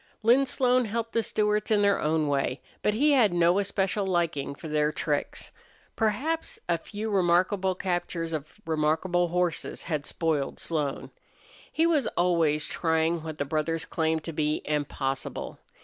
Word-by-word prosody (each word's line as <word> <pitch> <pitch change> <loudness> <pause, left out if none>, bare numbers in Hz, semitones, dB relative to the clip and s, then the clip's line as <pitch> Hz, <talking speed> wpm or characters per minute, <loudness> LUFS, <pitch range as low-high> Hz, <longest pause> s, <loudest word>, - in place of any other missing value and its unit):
Lin 255 +5 +5
Slone 250 -1 +2
helped 230 +1 -3
the 230 - +2
Stewarts 210 -1 0
in 210 -2 +3
their 200 -1 +3
own 155 0 +1
way, 140 -1 0 0.2
but 210 - +1
he 295 +6 +4
had 245 -8 +5
no 175 +2 +3
especial 200 0 0
liking 170 -7 -1
for 160 - -9
their 150 0 +1
tricks. 150 -1 -2 0.4
Perhaps 255 +10 -1
a 170 -1 +1
few 215 +5 -5
remarkable 185 +1 +2
captures 175 -3 -2
of 155 +6 -6
remarkable 160 +3 +1
horses 175 -1 -1
had 155 -4 -2
spoiled 155 -4 -1
Slone. 150 -4 -2 0.6
He 325 - +2
was 310 -7 +2
always 165 -4 +2
trying 160 0 0
what 160 -1 -6
the 145 - -1
brothers 160 +2 -1
claimed 160 -1 -1
to 165 - -6
be 150 0 0
impossible. 145 -2 -3
170 Hz, 150 wpm, -27 LUFS, 155-210 Hz, 0.6 s, Lin